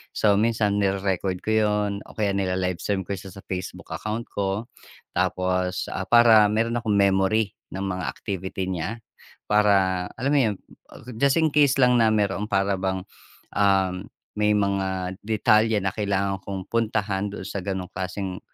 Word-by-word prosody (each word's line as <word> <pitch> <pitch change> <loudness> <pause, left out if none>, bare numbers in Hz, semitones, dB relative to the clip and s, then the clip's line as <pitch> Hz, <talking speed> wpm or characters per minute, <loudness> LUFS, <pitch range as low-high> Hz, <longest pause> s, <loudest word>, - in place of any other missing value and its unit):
So, 100 -1 +3
minsan 110 -2 +1
nire-record 95 -2 -1
ko 110 - -1
yun 105 -1 +2 0.2
o - - -15
kaya 105 -2 0
nila-live-stream 95 0 -1
ko 95 - -8
siya 95 0 -5
sa 95 - -11
Facebook 90 -1 -6
account 110 +2 -3
ko. 100 +1 -2 0.5
Tapos, 90 0 -1
ah, 95 0 -4
para 115 -3 +7
meron 115 +2 0
akong 110 -3 0
memory 100 +2 +2 0.2
ng 95 - -3
mga 95 -1 -3
activity 95 -2 -4
niya 100 +7 -4 0.5
para 95 -3 +3
alam 135 +4 -1
mo 145 - +5
'yun, 110 -5 +2 0.6
just 140 0 +3
in 160 -1 +2
case 145 -2 +4
lang 125 -1 +5
na 115 - +5
meroong 105 -1 0
para 100 -1 +1
bang, 95 -1 -2 0.5
um, 95 -1 +2 0.3
may 105 0 +3
mga 95 -2 -1
detalye 110 0 +3
na 95 - 0
kailangan 100 -2 -1
kong 95 -2 -6
puntahan 105 -3 0
don - - -7
sa 100 - -4
ganoong 95 -2 -4
klaseng, 95 0 -4
100 Hz, 155 wpm, -24 LUFS, 95-110 Hz, 0.6 s, para